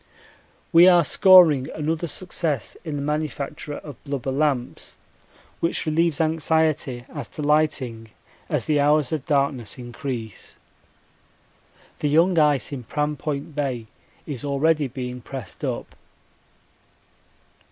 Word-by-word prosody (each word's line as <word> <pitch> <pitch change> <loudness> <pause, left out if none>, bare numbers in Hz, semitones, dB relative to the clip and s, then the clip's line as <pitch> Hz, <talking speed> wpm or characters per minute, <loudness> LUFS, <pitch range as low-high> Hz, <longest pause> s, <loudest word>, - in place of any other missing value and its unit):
We 170 +2 +8
are 175 -2 +6
scoring 165 -6 +6
another 160 +2 -2
success 160 - -3
in 155 -4 -4
the 140 - -3
manufacture 150 0 -3
of 145 -5 -10
blubber 140 -2 -3
lamps, 135 -3 -2 0.6
which 165 - -1
relieves 160 0 +1
anxiety 155 -5 0
as - - -5
to 150 - -7
lighting 145 -7 0 0.4
as - - -1
the 150 -2 +2
hours 145 -1 +3
of 155 -4 -3
darkness 140 -7 0
increase. 120 -3 -7 1.4
The 150 - 0
young 165 +3 +4
ice 150 -3 +2
in 130 -3 -5
Pram 150 +5 -2
Point 150 +2 -4
Bay 135 -6 -2 0.4
is 140 -6 -6
already 145 +1 +1
being 125 -1 -6
pressed 125 -5 -8
up. - - -4
145 Hz, 120 wpm, -23 LUFS, 135-155 Hz, 1.4 s, We